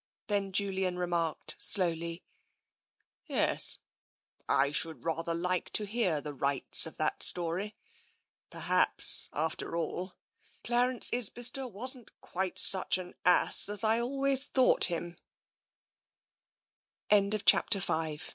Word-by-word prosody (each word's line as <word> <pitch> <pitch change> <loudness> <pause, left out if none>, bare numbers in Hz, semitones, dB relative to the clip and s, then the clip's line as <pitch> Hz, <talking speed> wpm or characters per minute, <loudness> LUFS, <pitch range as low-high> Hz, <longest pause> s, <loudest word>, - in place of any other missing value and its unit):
Then 200 -2 -3
Julian 190 -2 -2
remarked 170 -3 -4
slowly: 170 -2 0 0.5
" - - -54 0.2
Yes - - +5 0.4
— - - -27
I 140 - -4
should 160 +2 -2
rather 165 0 -4
like 180 +1 -3
to 210 - +1
hear 200 -7 -2
the 150 0 -7
rights 140 0 0
of - - -13
that - - -3
story. 180 +5 0 0.7
Perhaps, - - +1
after 170 - -5
all, 180 +3 -6 0.5
Clarence 245 +1 +2
Isbister 245 +2 +3
wasn't 245 +3 -3
quite 185 0 -6
such 190 -1 +2
an 180 -1 -10
ass 180 +2 +2
as 205 0 0
I 220 +1 +1
always 270 +2 +4
thought 260 -8 +3
190 Hz, 105 wpm, -28 LUFS, 170-235 Hz, 0.7 s, Yes